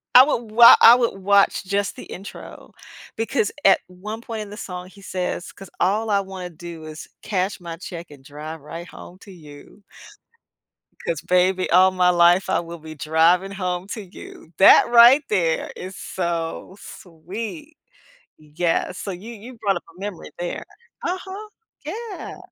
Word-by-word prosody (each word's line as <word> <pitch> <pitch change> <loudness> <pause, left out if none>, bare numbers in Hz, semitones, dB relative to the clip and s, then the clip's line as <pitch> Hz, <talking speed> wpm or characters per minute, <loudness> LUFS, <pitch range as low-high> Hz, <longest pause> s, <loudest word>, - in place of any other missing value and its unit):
I 255 - +11
would 235 -6 -2
wa 235 +2 +9
I 235 - +10
would 235 -5 -1
watch 200 +1 +3
just 200 +1 -1
the - - -10
intro, 195 +2 -11 0.4
because 225 -1 -1 0.2
at 195 - +6
one 205 +5 -8
point 225 -2 -6
in 210 - -8
the 210 - -10
song, 180 -2 -7
he 200 +1 -17
says, 180 -2 -4
"'Cause 195 -2 -12
all 210 +5 +1
I 200 -1 +3
wanna 190 -2 -7
do 170 0 -10
is 155 0 -9 0.2
cash 195 -2 -2
my 170 -1 -7
check 170 -1 -8
and 140 - -14
drive 150 +3 -8
right 165 +4 -8
home 180 - -13
to 195 - -14
you 155 +3 -15 1.3
’cause, - - -2
baby, 180 +1 +1
all 185 +2 +6
my 180 -1 +2
life, 175 +1 +4
I - - +2
will 170 0 -8
be 155 -1 -11
driving 165 +5 +2
home 185 -1 -3
to 220 - -6
you." 180 -3 -13
That 195 - +7
right 240 +4 +7
there 170 -6 0
is 185 +1 -8
so 170 0 -4
sweet. 215 - -9 0.6
Yeah, 165 +4 -2
so 195 +1 -6
you 205 +7 -9
you 235 +3 -12
brought 200 -2 +1
up 175 - -5
a 180 - -17
memory 200 -3 -7
there. 175 0 -4 0.4
Uh-huh, 380 +3 -5 0.4
yeah. 430 +6 -7
185 Hz, 165 wpm, -22 LUFS, 175-215 Hz, 1.3 s, I